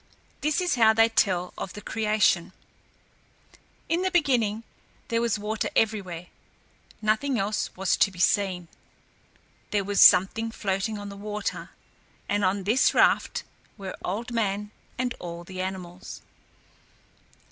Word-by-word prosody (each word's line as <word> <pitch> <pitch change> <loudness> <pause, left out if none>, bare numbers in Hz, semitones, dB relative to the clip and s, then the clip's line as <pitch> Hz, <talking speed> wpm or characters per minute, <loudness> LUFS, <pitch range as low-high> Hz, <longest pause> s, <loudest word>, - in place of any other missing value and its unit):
This 305 +3 +1
is 360 - +1
how 220 0 +7
they 225 +1 +4
tell 180 -5 +1
of - - -5
the - - -8
creation: 210 -6 +1 1.3
In 335 +2 +1
the 375 - +1
beginning 245 - +1 0.5
there 230 0 +1
was 235 -3 +1
water 210 +1 -2
everywhere; 190 -6 0 0.8
nothing 225 +5 +1
else 210 +1 -1
was 190 0 +1
to - - +4
be 190 - -15
seen. 185 -1 +1 1.0
There 205 -1 0
was 200 0 +1
something 195 +5 +6
floating 205 0 -2
on 205 0 -7
the 200 - -9
water, 210 0 -4 0.6
and 205 0 0
on 190 +1 +1
this 225 +7 +3
raft - - +3 0.3
were 195 -2 -6
Old 225 +6 -3
Man 210 -2 -1 0.3
and 250 0 -1
all 170 0 -7
the 185 +1 -6
animals. 185 -1 -7
205 Hz, 135 wpm, -26 LUFS, 190-225 Hz, 1.3 s, how